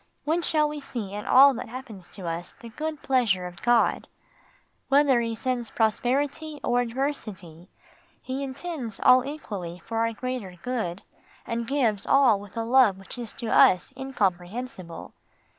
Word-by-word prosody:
When 320 +3 +1
shall 305 -2 +2
we 295 0 -5
see 230 -8 -5
in 210 0 -6
all 275 +1 +8
that 230 - -6
happens 225 -7 -9
to 185 -4 -8
us 165 +1 -5
the 235 - -10
good 305 +5 -5
pleasure 225 -9 +2
of 175 -1 -9
God? 240 -1 +2 0.8
Whether 275 -3 +4
He 230 -1 -2
sends 245 -1 -2
prosperity 275 +7 0
or 245 0 +2
adversity, 215 - -4 0.5
He 265 +1 -5
intends 275 - -4
all 255 0 +6
equally 205 - -6
for 225 0 -3
our 230 0 +1
greater 240 -5 -5
good, 220 -8 -3 0.4
and 230 0 -3
gives 230 -8 0
all 260 -7 +5
with 205 +2 -12
a 230 - 0
love 235 -4 +4
which 195 - -10
to 235 -1 -6
us 180 - +5
is - - -28
incomprehensible. 195 -5 -3
240 Hz, 155 wpm, -26 LUFS, 200-270 Hz, 0.8 s, all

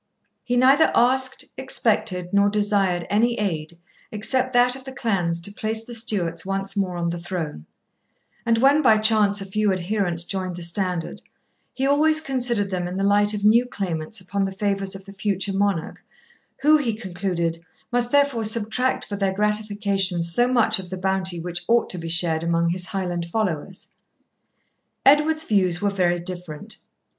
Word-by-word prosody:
He 245 0 -1
neither 270 +5 +5
asked, 260 +2 +2
expected, 180 0 0
nor 200 0 +4
desired 200 -4 +1
any 235 +3 +1
aid 170 -5 -3 0.3
except 255 +5 +1
that 245 +1 +4
of 265 - -10
the 265 - -8
clans 195 -10 -1
to 200 - -2
place 220 +1 -1
the 240 - -9
Stuarts 190 -8 0
once 195 +1 -3
more 185 -3 -1
on 170 0 -1
the 175 - -5
throne; 170 - -5 0.8
and 230 -1 +2
when 275 +5 +4
by 220 -6 +5
chance 215 -2 +2
a - - -5
few 210 +1 0
adherents 185 -2 -1
joined 185 0 -4
the 175 - -7
standard, 180 -1 -2 0.5
he 265 - -1
always 310 +3 +3
considered 245 -8 -1
them 180 -1 -2
in 180 +1 -5
the 195 - -1
light 205 +1 +4
of 205 0 -3
new 230 +3 +5
claimants 180 -3 -4
upon 195 +2 -3
the 195 - -3
favours 195 0 -2
of 190 0 -10
the 195 - -11
future 195 0 -1
monarch, 195 -4 -1 0.6
who, 305 +2 +6
he 240 -7 -2
concluded, 180 -5 -3 0.3
must 245 0 +2
therefore 280 -5 +2
subtract 225 +4 0
for 205 - -5
their 195 -1 -1
gratification 205 -3 0
so 170 +9 +2
much 225 -4 +3
of 180 -2 -8
the 185 - -5
bounty 190 -1 -1
which 175 +1 -5
ought 235 +1 +2
to 180 - -3
be 165 0 -6
shared 165 -1 0
among 170 0 +1
his 180 +1 -2
Highland 175 -3 -3
followers. 185 -2 -3 1.2
Edward's 300 +3 +4
views 185 - +1
were 205 0 0
very 180 -3 +1
different. 175 +2 -7
200 Hz, 170 wpm, -23 LUFS, 180-225 Hz, 1.2 s, who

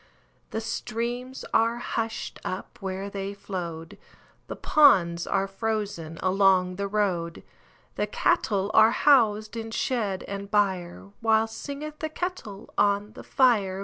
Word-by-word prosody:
The 220 - -3
streams 240 +3 -4
are 230 +1 +3
hushed 225 -1 -4
up 185 - -6
where 190 0 -4
they 200 0 -5
flowed, 170 -5 -6 0.5
The - - -5
ponds 175 - +4
are 195 0 +1
frozen 195 -6 -3
along 185 -1 +3
the 200 0 -2
road, 185 -5 -1 0.5
The - - 0
cattle 210 - +1
are 220 0 +7
housed 220 -5 +3
in 225 -1 -5
shed 215 -5 -1
and 200 0 -6
byreWhile 205 +3 0
singeth 290 +6 -7
the 315 - -3
kettle 310 - -6
on 205 +1 +2
the - - -10
fire. 210 -8 +2
205 Hz, 125 wpm, -26 LUFS, 190-230 Hz, 0.5 s, are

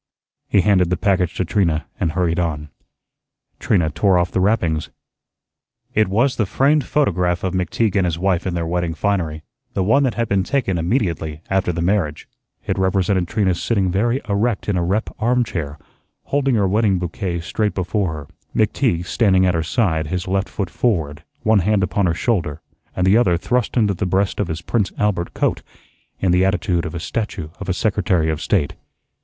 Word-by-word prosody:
He 100 - +4
handed 90 -2 +3
the 90 - 0
package 90 -1 +1
to 95 - -1
Trina 85 -4 0
and 80 - 0
hurried 85 -1 0
on. 75 -3 -2 0.9
Trina 85 -7 +1
tore 90 +5 +3
off 90 +1 +1
the - - 0
wrappings. 85 -7 +1 1.0
It 110 0 +3
was 120 +8 +1
the 110 - +1
framed 140 +4 +2
photograph 90 - +1
of 95 -1 -1
McTeague 95 +4 0
and 95 -2 +3
his 85 -2 -2
wife 95 0 0
in 90 - -2
their 85 -1 -1
wedding 85 0 -1
finery, 80 -6 -1 0.3
the 95 - +1
one 115 +9 +3
that 130 -4 +1
had 115 -1 -1
been 100 -1 +2
taken 95 -7 0
immediately 85 - -1
after 95 -2 +1
the 85 0 -2
marriage. 90 -5 0 0.4
It - - -1
represented 95 -1 +1
Trina 95 -1 +1
sitting 95 +1 0
very 120 +7 +1
erect 105 +2 0
in 105 - +1
a 90 - +1
rep 100 +6 -1
armchair, 110 -11 -1 0.5
holding 135 -2 +1
her 100 -3 +2
wedding 100 0 +2
bouquet 90 0 -3
straight 105 +5 -1
before 95 0 -1
her, 75 -2 -7 0.3
McTeague 85 +1 +1
standing 95 -2 +3
at 90 - +2
her 80 - 0
side, 80 -3 0
his 90 +3 -3
left 95 +1 0
foot 95 -4 -4
forward, 80 -11 -1 0.2
one 110 -1 +4
hand 100 +2 +2
upon 95 +1 +1
her 85 - 0
shoulder, 85 - -1 0.4
and 90 - +1
the 95 +4 +5
other 90 -8 +3
thrust 125 +6 -1
into 105 -4 +3
the 95 +1 -2
breast 95 +2 0
of 100 - 0
his 80 +1 -5
"Prince 105 +2 0
Albert" 100 -5 -1
coat, - - 0 0.6
in 95 - +1
the 90 +1 +4
attitude 90 -3 0
of - - -7
a - - -3
statue 95 -3 -4
of 100 -2 -6
a - - +2
Secretary 90 -6 +1
of 80 0 -4
State. 85 -9 0
95 Hz, 190 wpm, -20 LUFS, 85-105 Hz, 1.0 s, the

